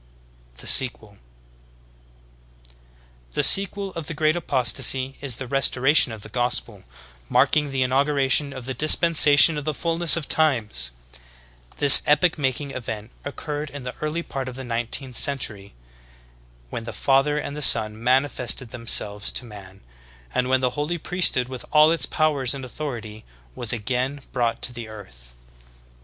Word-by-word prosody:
"* - - -32
THE - - -12
SEQUEL. 120 -4 +3
32. 100 - -24 2.1
The - - -1
sequel 195 0 +3
of 165 -3 -7
the 165 - -7
Great 155 +1 0
Apostasy 130 -3 0
is 135 -5 -3
the 135 - -7
Restoration 135 +1 +2
of 110 -2 -10
the - - -11
Gospel, 120 -3 -3 0.4
marking 145 +3 +1
the 135 -1 -2
inauguration 140 +1 0
of 130 -3 -10
the 130 - -5
Dispensation 155 +1 +5
of - - -9
the 155 0 -4
Fulness 170 +1 +4
of 160 - -6
Times. 120 - +2 0.9
This 145 -2 +9
epoch 150 +3 +1
making 140 +1 -3
event 115 -3 -8
occurred 145 +1 -7
in 140 -2 -10
the 125 0 -7
early 155 +3 -4
part 135 -4 -7
of 125 - -11
the 130 - -8
nineteenth 120 +2 -1
century, 105 - -1 1.0
when 115 - -7
the - - -8
Father 140 +2 0
and 145 -1 -6
the 150 - -7
Son 110 -4 +4
manifested 130 -1 0
themselves 105 -4 0
to - - -4
man, 100 -4 -14 0.5
and 125 0 -2
when 130 0 0
the 125 -1 -1
Holy 150 +5 -4
Priesthood 170 -7 -1
with 130 -1 -9
all 155 +1 +4
its 165 - 0
powers 145 -5 -1
and 135 -1 -8
authority 115 -5 -9 0.3
was 120 - -2
again 130 +5 -4
brought 120 -2 -3
to 120 -2 -3
earth. - - -15
130 Hz, 150 wpm, -21 LUFS, 115-150 Hz, 2.1 s, This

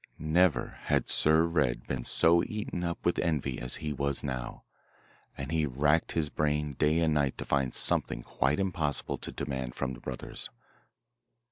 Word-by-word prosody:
Never 80 +2 +1
had - - +1
Sir 80 +1 +4
Red 75 -8 0
been 60 -2 -4
so 85 +1 +4
eaten 105 -4 -4
up 85 -1 -4
with 85 - +2
envy 75 -6 -1
as 60 +1 -1
he 75 - -1
was 70 0 -1
now, 65 -3 -5 0.7
and 70 +3 -5
he 80 -2 +1
racked 75 +5 +1
his 80 -2 0
brain 75 -1 -1
day 75 +4 +2
and 80 -2 +2
night 70 -3 +1
to - - -5
find 70 -3 +1
something - - +2
quite 75 +2 0
impossible 85 -7 -1
to - - -6
demand 65 -3 -4
from 65 -2 -2
the - - -10
brothers. - - -3
75 Hz, 165 wpm, -30 LUFS, 70-80 Hz, 0.7 s, Sir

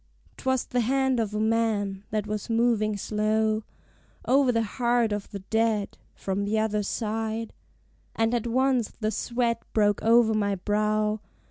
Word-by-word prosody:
'Twas 260 -1 0
the 245 - -1
hand 265 +1 +1
of 220 -3 -1
a - - 0
man, 215 -3 0
that 210 -1 -1
was 210 +1 -4
moving 225 -2 +2
slow 215 +1 0 0.6
O'er 265 0 +4
the 230 -1 +1
heart 235 0 +1
of 205 -1 -3
the 200 - -6
dead, 220 -2 +1 0.2
from 195 +1 -2
the 210 +2 0
other 215 -1 +1
side: 220 +1 -3 0.6
And 225 +1 +1
at 240 -1 0
once 255 -1 +2
the 215 -1 0
sweat 235 +1 -1
broke 205 -2 +2
over 225 0 +4
my 205 -2 +1
brow. 210 +2 0
220 Hz, 150 wpm, -26 LUFS, 210-235 Hz, 0.6 s, O'er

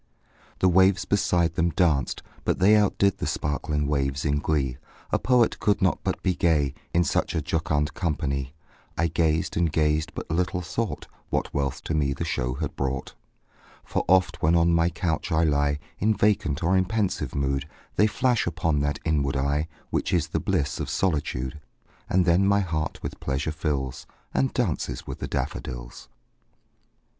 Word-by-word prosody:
The 95 - +5
waves 95 +1 +4
beside 85 -4 +2
them 85 -1 +1
danced; 80 -7 +1 0.2
but - - +1
they 100 +4 +5
Outdid 100 -2 +2
the - - -2
sparkling 75 0 -1
waves 70 -1 -1
in 70 0 +1
glee; 70 -5 0 0.3
A - - +2
poet 125 -2 +3
could 105 - +2
not 95 -1 +2
but - - -2
be 95 - +2
gay, 75 -6 +2 0.2
In 85 - +3
such - - 0
a 80 - +1
jocund 75 -2 0
company; 70 -4 -2 0.4
I 85 - +2
gazed 80 -1 +1
and 85 -2 +1
gazed 75 0 +1
but - - -6
little 90 +2 0
thought 115 +4 -3 0.2
What - - -1
wealth 70 -2 -2
to - - -2
me 70 -3 +1
the 85 - -4
show 60 -5 -1
had 75 0 -4
brought: 65 -1 -3 0.7
For - - -1
oft, 95 +1 +3
when 80 +2 +4
on 85 0 +4
my 85 0 +3
couch 85 0 -2
I 80 +1 +3
lie 70 -2 +2 0.2
In 110 +2 +2
vacant 90 -8 +1
or 90 +3 +3
in 95 0 +3
pensive 105 0 -1
mood, 70 +1 -1 0.3
They 105 - +5
flash 120 +1 +1
upon 80 -3 0
that 75 0 0
inward 70 -4 +1
eye 70 +3 0 0.2
Which - - -1
is 85 -4 +1
the - - -1
bliss 70 -2 -1
of - - -3
solitude; 75 -5 -1 0.5
And 90 -1 +3
then 90 +3 +4
my 100 0 +4
heart 80 -4 -3
with - - -5
pleasure 70 +3 -2
fills, 75 -5 -3 0.3
And 65 0 +1
dances - - -2
with - - -7
the - - -3
daffodils. - - -5
80 Hz, 170 wpm, -26 LUFS, 70-90 Hz, 0.7 s, The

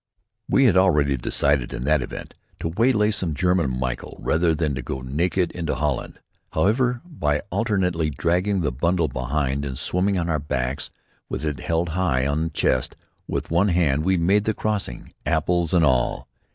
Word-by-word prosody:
We 135 - +4
had 110 - +5
already 75 -7 +4
decided 70 +1 +1
in - - -4
that 75 +1 +2
event 65 - -7 0.3
to 80 - -2
waylay 110 +3 +2
some 90 -7 -1
German 85 -7 +1
Michel 65 -1 -4
rather 80 0 +1
than 75 -2 0
to 65 - -3
go 65 +2 -5
naked 85 +7 0
into 85 -3 -3
Holland. 75 -1 -2 0.3
However, 120 +8 +2
by 75 - -1
alternately 90 -8 0
dragging 90 +7 0
the 75 - 0
bundle 85 +6 +1
behind 70 +1 -1
and 65 -2 -4
swimming 95 +6 0
on 85 -1 -1
our 80 -2 0
backs 70 -1 -3 0.4
with - - -3
it 75 -4 -2
held 85 +1 -1
high 80 -7 +1
on 70 +2 0
the - - -2
chest 65 -5 0 0.3
with - - -3
one 90 +5 +3
hand, 80 -6 +2
we 95 +1 +2
made 100 +5 +2
the 110 - 0
crossing, 105 - -3
apples 85 +1 +1
and 85 -3 +4
all. 65 -4 +1
80 Hz, 175 wpm, -23 LUFS, 70-95 Hz, 0.4 s, had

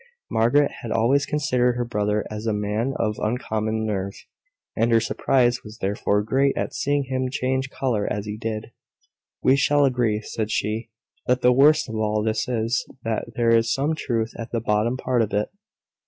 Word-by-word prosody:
Margaret 120 +6 +3
had 115 - -6
always 130 +6 +2
considered 125 -5 +1
her 120 0 -1
brother 105 -2 -1
as 105 +1 -5
a 110 - +1
man 105 +5 -1
of 105 -1 -1
uncommon 110 -1 -1
nerve; 100 -2 -2 0.6
and 115 +2 +2
her 115 - +6
surprise 125 +1 +1
was 110 0 -11
therefore 105 0 0
great 135 +5 +1
at - - -2
seeing 145 0 0
him 130 -1 -2
change 130 +1 -1
colour 120 -7 -1
as 105 0 -2
he 105 0 -4
did. 110 0 -5 0.7
"We 130 - +5
shall 145 +1 +3
agree," 120 -5 +1
said 110 0 -3
she, 110 +2 -2 0.4
"that 125 0 +2
the 125 0 +5
worst 150 +4 +5
of 110 -2 -5
all 105 -1 0
this 110 0 -1
is, 115 0 0 0.2
that 115 -1 -2
there 115 -1 +3
is 115 0 +2
some 140 +6 +1
truth 115 -7 -2
at 115 - -6
the 115 - 0
bottom 110 +3 0
part 125 -2 +1
of 110 - -1
it." 105 +1 0
115 Hz, 185 wpm, -23 LUFS, 110-130 Hz, 0.7 s, her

